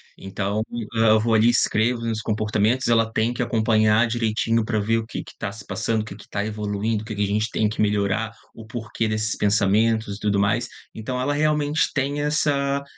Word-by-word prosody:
Então, 100 +2 -3
eh, 115 -1 0
eu 110 0 +5
vou 115 +1 +1
ali 110 +1 +5
e - - +6
escrevo 120 0 +2
os - - -4
meus 110 -1 -2
comportamentos, 110 +3 0
ela 115 -1 +3
tem 115 +2 0
que 125 - -3
acompanhar 110 -1 +3
direitinho 115 0 0
para 110 -1 -1
ver 115 +2 +1
o 110 - -5
que - - -5
que - - -14
tá 100 -2 -3
se 105 -1 -11
passando, 110 +3 -1
o - - -10
que 100 - -9
que 105 - -15
tá 100 0 -2
evoluindo, 105 0 -2
o - - -10
que 110 - -5
que 105 - 0
a - - +2
gente 105 +2 0
tem 110 -2 +1
que 105 - -3
melhorar, 105 +1 0 0.2
o 110 -1 -12
porquê 110 -1 -3
desses 110 +1 -1
pensamentos 105 +1 +1
e - - -16
tudo 100 -1 +1
mais. 110 +4 +1 0.3
Então 125 +3 -4
ela 145 +3 0
realmente 150 0 +1
tem 140 +1 -1
essa, 140 -2 0
110 Hz, 220 wpm, -23 LUFS, 105-120 Hz, 0.3 s, e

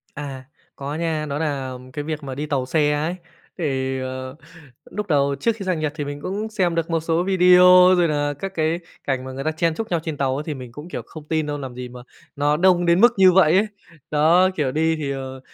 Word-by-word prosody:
À. 135 -2 -7 0.3
Có 140 +1 -5
nha, 160 -2 -2
đó 145 0 -3
nà 140 -4 -2 0.2
cái 145 +1 -4
việc 155 -1 -4
mà 135 -2 -6
đi 150 - -3
tàu 140 -4 -1
xe 150 +2 +1
ấy, 155 +4 -1 0.4
thì, 135 -5 -2
ờ, 130 +1 -6 0.6
núc 210 0 -2
đầu 140 -3 +2
trước 230 -1 +1
khi 200 - -6
sang 180 -3 -1
Nhật 155 -1 -1
thì 145 - -3
mình 145 0 -6
cũng 205 +7 -4
xem 185 -6 0
được 165 0 -2
một 165 -1 +1
số 165 +1 0
video 180 0 +6
rồi 175 -1 +3
nà 145 -1 0
các 195 +3 -5
cái 160 +1 0 0.2
cảnh 130 -2 -2
mà 130 - -7
người 135 +1 -6
ta 155 - +1
chen 160 +1 0
chúc 225 - -5
nhau 170 -2 +1
trên 160 -3 -4
tàu. 135 +1 -1
Thì 155 -1 -5
mình 125 -3 -9
cũng, 150 +7 -10
kiểu, - - -5
không 155 -2 -11
tin 155 -1 0
đâu, 145 0 -3
làm 130 -3 -7
gì 125 0 -7
mà 125 0 -11 0.4
nó 145 +1 +2
đông 175 0 +3
đến 170 +2 +4
mức 240 +1 +7
như 190 -1 +6
vậy 180 -2 +5
ấy. 210 - +2 0.4
Đó, 165 +5 +4
kiểu, 140 -5 0
đi 160 +2 +1
thì, 145 -3 -3
ờ, 130 -1 -6
155 Hz, 245 wpm, -22 LUFS, 140-175 Hz, 0.6 s, mức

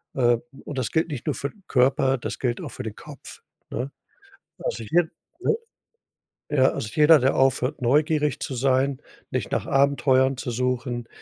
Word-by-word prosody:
Ähm, 120 -2 +3 0.2
und 145 - -7
das 125 -4 -1
gilt 160 +1 +1
nicht 140 -5 -5
nur 150 - 0
für 140 - -3
'n 205 - -22
Körper, 135 +1 +3
das - - -5
gilt 120 -2 -1
auch - - -6
für 130 - -7
den 110 -2 -6
Kopf, 145 -4 -12 0.3
ne? 130 +4 -3 0.7
Also 115 - -3
hier 165 +8 +2 0.3
ne? - - +2 1.0
Ja, 135 -3 +4
also 110 - -4
jeder, 155 0 +7
der 130 +1 +2
aufhört, 130 +1 +1
neugierig 150 +2 +2
zu 135 - -4
sein, 130 +1 +1 0.3
nicht - - -2
nach - - 0
Abenteuern 135 -1 +3
zu 125 - -4
suchen, 125 0 -2
130 Hz, 170 wpm, -24 LUFS, 125-145 Hz, 1.0 s, jeder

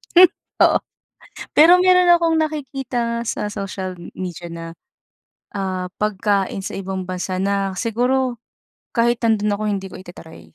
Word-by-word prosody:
Hmm, 360 - +10 0.4
oo. - - +4 0.8
Pero 320 +3 +8
meron 365 -1 +5
akong 335 -1 +3
nakikita 265 -6 -2
sa 210 - -2
social 195 -2 -5 0.2
media 175 -2 -6
na, 165 0 -7 0.9
ah, 185 -2 -2
pagkain 200 -2 0
sa 190 - -5
ibang 190 -1 -4
bansa 185 0 -3
na 195 0 0
siguro 245 +3 0 0.6
kahit 235 0 +2
nando'n 210 -2 +2
ako 215 - -6
hindi 195 -2 -2
ko - - -9
ita-try. 175 -3 -12
210 Hz, 130 wpm, -20 LUFS, 190-250 Hz, 0.9 s, Hmm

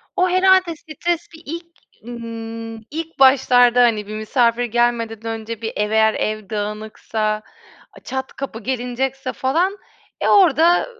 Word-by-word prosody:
O 365 0 +2
herhâlde 370 -1 +4
stres 335 +2 -3
bir 320 +1 -14
ilk 335 +3 -6 0.4
ımm, 230 -1 -7 0.2
ilk 325 0 -6
başlarda 245 -2 +5
hani 215 -4 +1
bir 215 - -6
misafir 235 +2 +1
gelmeden 230 -1 0
önce 225 0 -7
bir 225 - -4
ev 210 0 -1
eğer 220 0 +4
ev 215 -2 -3
dağınıksa, 215 0 -3 0.6
çat 265 0 -4
kapı 270 -5 -6
gelinecekse 255 +2 -3
falan, 340 +10 0 0.5
eee, - - +2
orada, 345 -2 +5
240 Hz, 130 wpm, -20 LUFS, 225-310 Hz, 0.6 s, başlarda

